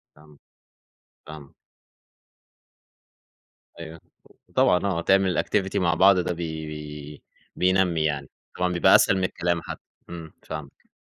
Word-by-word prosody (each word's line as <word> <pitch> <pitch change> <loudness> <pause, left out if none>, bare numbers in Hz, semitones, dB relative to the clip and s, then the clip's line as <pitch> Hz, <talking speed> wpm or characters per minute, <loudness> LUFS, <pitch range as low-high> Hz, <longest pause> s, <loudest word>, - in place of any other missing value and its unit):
فاهمك، 75 -1 -20 0.9
فاهمك. 75 -3 -11 2.3
أيوه، 80 -1 -9 0.5
طبعًا 90 +3 +3
آه، 90 -4 -1
تعمل 95 0 +2
activity 95 -1 -1
مع 85 -2 +2
بعض 95 +3 +5
ده 90 - -1
بي 80 -2 -5
بي 75 -1 -9 0.3
بينمي 90 -3 +2
يعني، 70 -3 -2 0.3
طبعًا 90 0 0
بيبقى 85 - +5
أسهل 95 - +4
من 95 - -1
الكلام 85 -2 -1
حتّي. - - -8 0.3
امم، 85 -2 -9
فاهمك. 75 -3 -9
85 Hz, 120 wpm, -24 LUFS, 75-90 Hz, 2.3 s, بعض